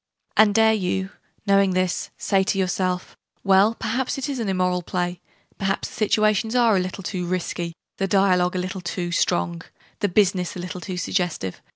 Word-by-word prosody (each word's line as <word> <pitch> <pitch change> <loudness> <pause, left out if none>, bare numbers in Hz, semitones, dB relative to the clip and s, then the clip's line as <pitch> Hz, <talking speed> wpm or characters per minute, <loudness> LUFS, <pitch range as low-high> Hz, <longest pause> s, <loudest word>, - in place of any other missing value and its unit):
And 210 -2 +5
dare 220 0 +5
you, 190 -1 -1 0.3
knowing 195 -2 +4
this, 185 -1 0
say 195 -1 +2
to 195 - 0
yourself 185 -1 -1 0.3
"Well, 195 +3 +4
perhaps 250 +5 -2
it 270 - -3
is 270 -3 -3
an 220 -4 -1
immoral 180 -1 +1
play: 175 0 -3 0.4
perhaps 195 0 -1
the - - -14
situations 215 +1 +1
are 235 -4 +4
a - - +3
little 185 +1 -4
too 180 -2 -3
'risky', 175 -1 -3 0.2
the 195 - +1
dialogue 185 -2 +3
a - - 0
little 185 +1 -3
too 175 0 -3
strong, 85 - 0 0.4
the 205 - +1
'business' 185 -2 +2
a - - -6
little 180 0 -6
too 185 0 -5
suggestive. 175 - -2
190 Hz, 180 wpm, -23 LUFS, 180-205 Hz, 0.4 s, And